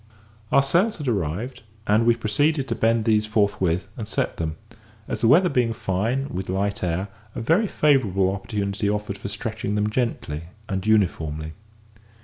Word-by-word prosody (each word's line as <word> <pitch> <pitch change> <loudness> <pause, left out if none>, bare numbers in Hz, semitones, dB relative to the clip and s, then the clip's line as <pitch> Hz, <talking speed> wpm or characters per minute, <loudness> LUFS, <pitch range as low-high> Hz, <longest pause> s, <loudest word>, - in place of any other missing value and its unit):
Our 140 - +5
sails 180 +10 +2
had 150 -4 -5
arrived, 110 - -2 0.2
and 110 +3 +3
we 120 - +5
proceeded 135 +6 +1
to - - +1
bend 115 0 +2
these 110 -1 +3
forthwith, 100 -5 +1
and 110 -6 -6
set - - -1
them; 80 -1 -2 0.5
as - - -3
the 115 - +4
weather 170 +9 +6
being 125 -7 +1
fine, 110 +7 -1
with 95 -4 -5
light 100 +2 -1
air, 90 +3 -1 0.3
a - - -3
very 165 - +3
favourable 105 - +2
opportunity 100 0 -2
offered 105 -1 -2
for - - -5
stretching 105 -1 -3
them 105 0 0
gently 105 -10 -2 0.2
and 95 0 -3
uniformly. 80 -7 +1
105 Hz, 160 wpm, -24 LUFS, 95-120 Hz, 0.5 s, weather